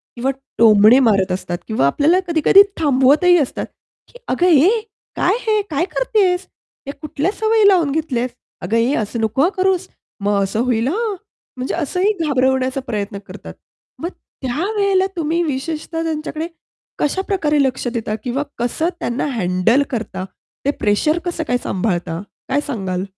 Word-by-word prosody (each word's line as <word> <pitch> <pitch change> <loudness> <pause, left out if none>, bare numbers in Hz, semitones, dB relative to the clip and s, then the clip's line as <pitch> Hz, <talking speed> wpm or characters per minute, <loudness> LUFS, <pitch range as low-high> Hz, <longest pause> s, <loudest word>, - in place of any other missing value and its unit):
किंवा 255 +3 0 0.3
टोमणे 220 +2 +7
मारत 200 -7 +3
असतात 175 -1 -3
किंवा 220 -11 +1
आपल्याला 300 - +3
कधी-कधी 335 +3 +6 0.2
थांबवतही 295 +4 +4
असतात. 285 -6 -1 0.4
की, - - -16
"अगं 355 - +1
ए 325 0 +6 0.5
काय - - +2
हे 430 -1 +3
काय 320 +3 0
करतेस? 390 -7 +1 0.4
ते 280 - -4
कुठल्या 300 +4 -3
सवयी 440 -1 +4
लावून 350 -7 +4
घेतल्यास. 275 -5 -1 0.3
अगं 225 - 0
ए 235 +4 +2
असं 225 +1 -2
नको 220 +4 0
हां 340 +6 +3
करूस, 375 0 +1 0.4
मग 200 0 +2
असं 195 +3 -2
होईल 240 -1 +1
हां." 425 - -1 0.4
म्हणजे 255 +1 -3
असंही 360 +5 0
घाबरवण्याचा 260 -1 +1
प्रयत्न 205 -2 -3
करतात. - - -10 0.5
मग 340 - -3 0.3
त्यावेळेला 380 - +1
तुम्ही 335 0 0
विशेषतः 320 +3 -3
त्यांच्याकडे 315 0 -3 0.5
कशा 300 +6 0
प्रकारे 300 -7 +1
लक्ष 260 -1 -1
देता 220 -3 -2
किंवा 265 +3 -1 0.2
कसं 245 +8 0
त्यांना 240 +2 -2
हँडल 210 +4 +2
करता, 220 -6 -4 0.4
ते 285 - +3
प्रेशर 210 +10 +2
कसं 345 -2 -2
काय 245 - +2
सांभाळता 175 -4 -2 0.3
काय 280 +2 +1
सांगाल? 190 -8 -3
280 Hz, 150 wpm, -19 LUFS, 230-345 Hz, 0.5 s, टोमणे